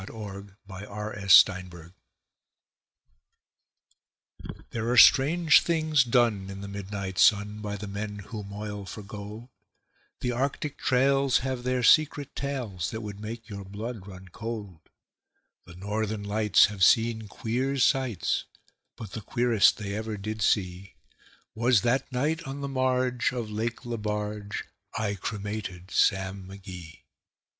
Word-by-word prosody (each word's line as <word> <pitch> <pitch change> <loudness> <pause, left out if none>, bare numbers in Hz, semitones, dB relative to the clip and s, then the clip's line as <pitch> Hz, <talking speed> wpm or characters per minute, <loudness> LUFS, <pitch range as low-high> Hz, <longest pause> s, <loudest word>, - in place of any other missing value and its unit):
The 100 -1 -9
Cremation 100 +1 -7
of 95 - +1
Sam 90 0 +7
Mcgee 85 0 -13 2.8
There 115 0 -2
are 125 - +1
strange 155 +7 +7
things 155 -4 +2
done 115 -5 +2
in 95 0 -7
the 100 - -6
midnight 100 -1 -5
sun 105 0 +4
By 105 -1 -4
the 105 - -6
men 105 +1 -5
who 105 +1 -7
moil 100 0 -6
for 105 - -8
gold; 105 +4 -9 0.7
The 125 - 0
Arctic 140 +3 -2
trails 135 +1 +3
have 130 -2 -2
their 125 0 -1
secret 145 +1 +3
tales 125 - -3
That 110 - -5
would 105 -2 -7
make 110 +1 -7
your 100 -2 -7
blood 105 +1 -7
run 95 -1 -11
cold; 105 -4 -6 0.9
The 85 - -12
Northern 105 +2 -3
Lights 105 0 +4
have 100 -2 -2
seen 110 +1 +3
queer 125 +7 -2
sights, 130 -6 +1 0.5
But 110 - -9
the 110 - -6
queerest 115 0 +3
they 100 -2 -5
ever 110 0 -4
did 110 +2 -5
see 95 -1 0 0.6
Was 115 -1 +3
that 125 +3 0
night 150 +6 0
on 135 +1 -5
the 140 - -3
marge 130 -2 +1
of 115 -4 -4
Lake 115 +3 -3
Lebarge 105 -2 -3 0.3
I 110 -2 -1
cremated 100 -2 -5
Sam 95 -1 +1
McGee. 90 -4 -10
105 Hz, 135 wpm, -27 LUFS, 100-125 Hz, 2.8 s, Sam